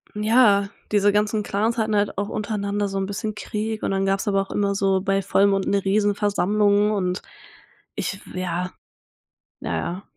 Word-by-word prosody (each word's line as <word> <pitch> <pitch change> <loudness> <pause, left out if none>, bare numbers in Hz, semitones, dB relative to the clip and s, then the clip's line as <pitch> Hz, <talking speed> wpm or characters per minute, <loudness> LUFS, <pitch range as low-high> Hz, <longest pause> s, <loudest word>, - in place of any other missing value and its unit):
ja, 210 -2 +4 0.2
diese 205 -1 +4
ganzen 210 +1 +1
Clans 215 +4 -1
hatten 215 -1 +1
halt 205 -2 0
auch 200 +1 -1
untereinander 205 -1 -2
so 195 0 -3
'n 190 - -1
bisschen 205 +2 -4
Krieg 215 +1 -4
und - - -1
dann 195 0 0
gab's 195 +1 0
aber 195 -1 +2
auch 195 - -11
immer 200 -1 0
so 195 -1 +1
bei 195 0 0
Vollmond 195 0 +2
'ne 200 0 +1
Riesenversammlung 205 0 +2
und 185 -3 -1 0.7
ich - - -2
f 195 - -15
ja. 180 0 -3 0.9
Ja, - - -3
ja. 180 +3 -4
200 Hz, 170 wpm, -23 LUFS, 195-210 Hz, 0.9 s, ja